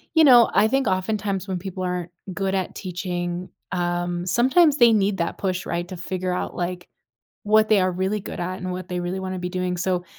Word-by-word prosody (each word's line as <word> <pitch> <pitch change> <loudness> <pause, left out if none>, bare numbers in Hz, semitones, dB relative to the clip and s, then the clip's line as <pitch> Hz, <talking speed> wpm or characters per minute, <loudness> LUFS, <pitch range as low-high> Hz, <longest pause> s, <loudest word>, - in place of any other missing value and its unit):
you 320 - +7
know, 245 -5 +7
I 215 - +5
think 270 +3 +1
oftentimes 195 0 -1
when 185 -2 -2
people 185 0 -5
aren't 180 -1 -2 0.2
good 195 0 -1
at 190 -2 -2
teaching, 180 -1 -4 0.2
um, 175 -1 -1
sometimes 275 - +4
they 240 -3 +7
need 200 -2 +2
that 170 -1 -2
push, 185 -2 -2
right, 175 +1 -2
to 185 - -7
figure 185 0 -3
out, 180 - -3
like, 180 0 -4 0.6
what 215 +1 +4
they 210 - +5
are 185 0 +2
really 190 +3 -1
good - - -7
at 185 +2 -3
and 185 0 -4
what 180 0 -6
they 180 -1 -2
really 180 +2 -3
wanna 185 0 -4
be 180 0 -3
doing. 180 0 -2
So, 180 0 -1
185 Hz, 210 wpm, -23 LUFS, 180-200 Hz, 0.6 s, you